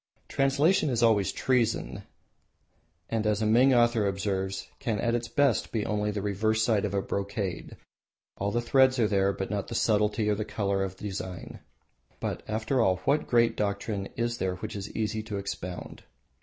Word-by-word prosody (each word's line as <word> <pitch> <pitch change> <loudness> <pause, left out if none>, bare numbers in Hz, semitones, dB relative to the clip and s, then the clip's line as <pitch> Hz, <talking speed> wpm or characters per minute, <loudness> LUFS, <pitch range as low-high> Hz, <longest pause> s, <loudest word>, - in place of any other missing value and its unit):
Translation 145 +5 +2
is 120 -2 +1
always 105 -4 +4
a - - -16
treason, 115 - 0 1.1
and 110 -1 -1
as 105 -1 +1
a 110 - 0
Ming 120 +5 +5
author 120 -4 +3
observes, 95 -1 -2
can 110 -3 -1
at 115 +3 0
its 120 0 -1
best 140 -5 +1
be 110 -3 -1
only 105 0 -1
the 105 -1 -3
reverse 110 +2 +1
side 110 -3 +2
of 100 -1 -2
a 100 - 0
brocade, 100 -2 -4 0.6
all 100 - -1
the 120 +3 0
threads 130 +2 +4
are 115 -3 +3
there, 100 -1 +2
but 95 0 -4
not 100 -1 -2
the 115 - -5
subtlety 105 0 +2
of 105 0 0
colour 100 -2 -1
or 95 - -1
design. 95 -2 -7 0.6
But, - - -3
after 110 +4 0
all, 95 -4 +3
what 150 +2 +2
great 120 -1 +3
doctrine 100 -1 -2
is 120 0 -2
there 95 -1 -1
which 90 - -6
is 100 0 -5
easy 110 0 -1
to 105 -2 -5
expound? 90 -2 -6
105 Hz, 180 wpm, -28 LUFS, 100-115 Hz, 1.1 s, Ming